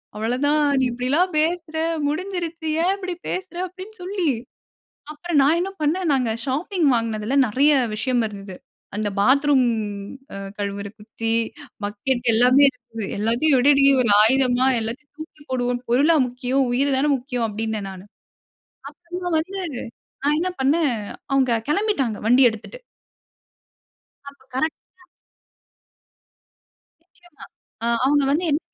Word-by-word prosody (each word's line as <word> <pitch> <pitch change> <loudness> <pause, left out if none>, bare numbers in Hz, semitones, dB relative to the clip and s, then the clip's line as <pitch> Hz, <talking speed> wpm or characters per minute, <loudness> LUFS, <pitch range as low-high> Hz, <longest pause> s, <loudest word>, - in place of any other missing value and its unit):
அவ்வளவதான் 260 +8 +1 0.2
நீ - - +2
இப்பிடியெல்லாம் 275 +10 +1
பேசுற! 325 0 -1 0.3
முடிஞ்சிருச்சு. 335 0 -4 0.2
ஏன் 370 - +3
இப்பஜடி 370 -3 -5
பேசுற? 370 -1 -5
அப்பிடின்னு 375 +4 -11
சொல்லி, 370 -2 -2 0.9
அப்புறம் 315 0 -2
நான் 300 +4 +4
என்ன 385 +2 -2
பண்ணேன், 340 +5 0
நாங்க 250 -4 +1
ஷாப்பிங் 310 +5 -1
வாங்கினதில 230 +1 -1
நிறைய 280 +7 +3 0.2
விஷயம் 245 +2 0
இருந்தது. 195 -2 -9 0.4
அந்த 210 0 -1
பாத்ரூம் 270 +3 +4 0.7
அ - - -6 0.2
கழுவுற 200 0 -4
குச்சி, 225 +1 -3 0.5
பக்கெட் 235 +5 -2
எல்லாமே 250 +4 +5
இருந்தது. 225 -4 -9
எல்லாத்தையும் 240 +7 +2
எடுடி! 275 +1 +5 0.2
ஒரு 230 - +1
ஆயுதமா 255 +2 +3
எல்லாத்தையும் 250 +7 -6
தூக்கி 315 -1 -11
போடுவோம். 245 -1 -1
பொருளா 290 +7 +4
முக்கியம், 250 +2 -1
உயிர் 275 +3 +1
தான 295 +2 +2
முக்கியம் 250 -2 -3
அப்பிடினேன் 215 -1 -3
நானு. 190 +1 -11 0.8
அப்பறமா 355 +1 -6
வந்து 380 +5 -4 0.6
நான் 295 +1 +2
என்ன 365 +2 -1
பண்ணேன்? 290 0 +2 0.4
அவுங்க 260 -4 +3
கிளம்பிட்டாங்க 300 - 0
வண்டிய 250 +1 +6
எடுத்துட்டு. 225 - -10 1.5
அப்ப 280 -1 -14
கரெக்ட் 310 +4 -2 0.2
ஆ - - -28 2.0
நிச்சயமா. 350 0 -18 0.4
அ - - 0 0.2
அவுங்க 285 +1 +3
வந்து 320 +5 +1
என் 295 +2 +1
275 Hz, 125 wpm, -22 LUFS, 240-320 Hz, 2.0 s, வண்டிய